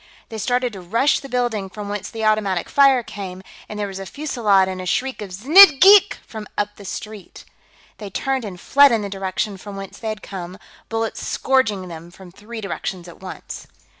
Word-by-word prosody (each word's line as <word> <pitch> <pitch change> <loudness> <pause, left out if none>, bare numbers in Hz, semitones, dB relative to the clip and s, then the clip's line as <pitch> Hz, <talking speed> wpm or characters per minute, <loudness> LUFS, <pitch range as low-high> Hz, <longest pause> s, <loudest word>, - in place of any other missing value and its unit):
They 220 -2 -6
started 245 +2 0
to 195 - -8
rush 230 +11 +1
the 275 - -11
building 240 -6 -1
from 205 +1 -8
whence 205 -1 -5
the 225 -1 -4
automatic 210 -4 +1
fire 275 -3 +4
came, 190 -3 -8 0.3
and 210 - -6
there 205 - -2
was 195 -1 -7
a 195 - -6
fusillade 215 - +1
and 185 -1 -5
a 185 - -6
shriek 260 +5 -1
of 205 - -6
"Znidd 280 - +7
geek!" 400 +1 +7
from 215 -2 -8
up 205 0 -2
the 200 - -12
street. 210 0 -8 0.5
They 205 -2 -7
turned 265 +6 -2
and 190 -4 -7
fled 285 +6 +5
in 225 -3 +1
the 200 - -4
direction 195 +1 -3
from 200 +2 -9
whence 195 -1 -9
they 220 - -4
had 215 -1 -6
come, 185 -1 -7 0.3
bullets 225 -1 -3
scourging 220 -8 0
them 170 0 -10
from 180 +1 -14
three 220 +5 -9
directions 190 -3 -5
at 175 - -13
once. 190 - -9
210 Hz, 200 wpm, -21 LUFS, 190-240 Hz, 0.5 s, Znidd